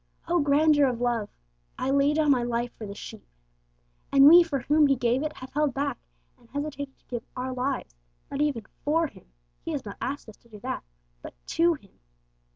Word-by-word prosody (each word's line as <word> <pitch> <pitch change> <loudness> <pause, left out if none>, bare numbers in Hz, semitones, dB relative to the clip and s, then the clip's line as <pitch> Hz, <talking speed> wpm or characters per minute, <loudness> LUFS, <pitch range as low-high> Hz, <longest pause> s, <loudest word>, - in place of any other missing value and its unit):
Oh, 345 +1 +2
grandeur 290 0 +4
of 245 -2 -2
love! 235 -4 0 0.5
'I 260 - -1
lay 280 +1 +3
down 305 -2 +3
My 255 -3 +3
life 240 0 -1
for 215 - -7
the 200 - -7
sheep!' 65 - -10 0.8
And 275 0 +7
we 340 +3 +10
for 310 -6 -1
whom 300 +3 +4
He 275 - +3
gave 245 +1 +1
it 310 0 -2
have 255 -2 -10
held 295 -2 +1
back, 280 -1 -2 0.4
and - - -23
hesitated 285 -1 -5
to - - -36
give 240 -2 -5
our 255 +1 -3
lives, 255 - -2 0.4
not 280 - -2
even 275 -8 0 0.2
for 325 +3 +2
Him 290 - -11 0.4
(He 330 - -4
has 280 -5 -4
not 200 - -7
asked 280 0 -4
us 220 - -12
to 235 - -26
do 210 -2 -11
that), - - -3 0.4
but - - -10
to 335 0 +3
Him! 200 -9 -20
275 Hz, 205 wpm, -27 LUFS, 240-295 Hz, 0.8 s, we